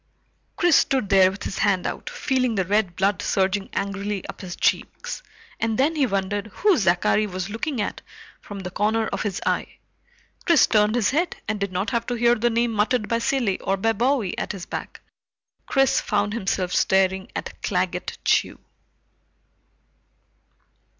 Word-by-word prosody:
Chris 350 -5 +4
stood 260 -8 +1
there 190 -1 +6
with 195 +1 -8
his - - -4
hand 195 -4 +2
out, - - -4
feeling 255 -3 0
the 190 -2 0
red 200 -2 +1
blood 195 +1 +1
surging 195 +1 0
angrily 200 0 -3
up - - -8
his 180 -3 -6
cheeks, - - -1 0.4
and 225 -1 0
then 295 +5 +2
he 280 -4 +2
wondered 200 0 -2
who 390 - +2
Zachary 195 - +2
was 185 0 -5
looking 245 +4 -3
at 205 - -3 0.4
from 200 -1 -8
the 180 -1 -6
corner 220 +4 +1
of - - -3
his 200 -3 -2
eye. - - -1 0.7
Chris 340 -3 +6
turned 210 0 +2
his 230 -4 +2
head 335 +6 0
and 215 -1 -2
did 200 -1 -2
not 185 +6 -2
have 235 -2 -1
to 245 - -1
hear 240 0 +4
the 240 0 +1
name 235 0 +1
muttered 215 +1 +1
by 230 0 0
Cilley 235 -6 0
or 195 0 -1
by 225 +3 +1
Bowie 235 -3 0
at - - -3
his 185 -4 -7
back. - - -7 0.7
Chris 270 -1 +3
found 205 0 0
himself 190 -4 -1
staring 190 0 +2
at - - -6
Claggett - - -2
Chew. - - +2
210 Hz, 170 wpm, -23 LUFS, 195-240 Hz, 0.7 s, there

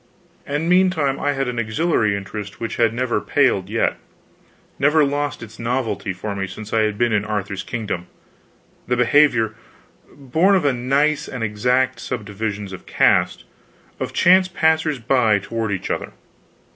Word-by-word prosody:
And 145 +3 -2
meantime 175 -7 +2
I 145 - 0
had 135 -1 -2
an 120 -1 -3
auxiliary 110 -2 +1
interest 100 +1 -7
which 115 - -4
had 115 -2 +3
never 120 -2 -1
paled 115 -10 +1
yet, 115 +1 0 0.8
never 150 +2 +4
lost 145 -2 -2
its 110 0 -12
novelty 115 -5 -2
for 100 +3 -5
me 95 -1 -3
since 105 +3 -9
I 115 - +3
had 105 -1 0
been 120 -1 +1
in 105 -1 +2
Arthur's 100 -2 -3
kingdom: 105 -7 -4 0.8
the 125 - +1
behavior 120 -3 +3 0.6
born 160 +8 +2
of 185 - +2
nice 140 +5 +1
and 125 -3 -5
exact 125 +4 +1
subdivisions 105 -4 -4
of 95 - -10
caste - - +2 0.6
of - - -3
chance 185 +1 +5
passers 160 -4 +1
by 120 -3 +2
toward 110 +2 -3
each 95 - -3
other. - - -4
120 Hz, 150 wpm, -21 LUFS, 105-145 Hz, 0.8 s, chance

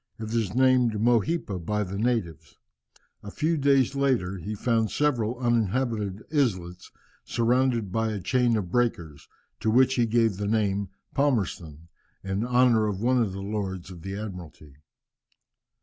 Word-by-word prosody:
It 110 0 -6
is 110 -4 -1
named 130 -2 +4
Mohipa 115 - +1
by 105 +4 -1
the 100 +1 -5
natives. 110 - -2 0.6
A 100 - -8
few 155 +10 0
days 140 -3 +3
later 125 -10 0
he 105 +5 -5
found 115 0 0
several 125 -5 0
uninhabited 115 -3 -1
islets, 95 - -1 0.3
surrounded 120 -3 +1
by 110 +1 0
a 105 - -3
chain 120 +4 +1
of 90 -5 -4
breakers, 85 - -2 0.3
to 110 - 0
which 130 +3 +4
he 120 -3 +1
gave 115 -3 +2
the 100 0 -3
name 100 -2 0
of 95 - -41
Palmerston, 95 - -1 0.4
in 95 +2 -2
honour 120 -3 +3
of 100 -3 -3
one 125 +3 +2
of 110 -4 0
the 95 +1 -6
Lords 95 -3 -4
of 85 -2 -11
the 95 +3 -6
Admiralty. 85 -8 -9
110 Hz, 150 wpm, -26 LUFS, 95-125 Hz, 0.6 s, named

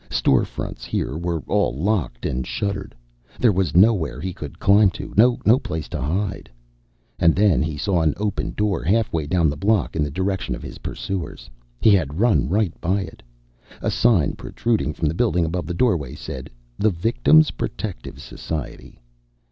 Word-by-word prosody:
Store 65 - +3
fronts - - -7
here - - -2
were 85 -1 -3
all - - +1
locked 75 - -1
and 65 0 -2
shuttered. 100 -8 -3 0.4
There 120 - +4
was 95 -6 -1
nowhere 95 -5 +3
he 95 0 -4
could 75 -5 -9
climb 100 +1 +5
to, - - -8
no 120 +1 +4
place 80 - -5
to - - -4
hide. 95 +8 -2 0.7
And 85 -1 +4
then 100 -4 +3
he 80 -1 -2
saw 90 +2 +1
an 80 -2 +1
open 105 0 -2
door 105 -2 0
halfway 90 -6 0
down 85 0 +2
the 75 - -1
block 105 +3 +1
in 80 - 0
the 75 - -2
direction 95 +5 -2
of - - -10
his - - -9
pursuers. 80 -9 -5 0.3
He 110 - +6
had 80 -5 +1
run 95 - +3
right 100 -1 +1
by 95 +4 +1
it. 95 - -9 0.6
A - - -1
sign 110 -11 +3
protruding 105 -11 -2
from 80 - -1
the 75 - 0
building 90 -3 +1
above 85 +2 -3
the 90 - -3
doorway 85 - 0
said 65 +2 -7 0.3
THE 110 - +3
VICTIM'S 115 - +3
PROTECTIVE 95 - -5
SOCIETY. 75 -3 -7
90 Hz, 170 wpm, -22 LUFS, 75-105 Hz, 0.7 s, He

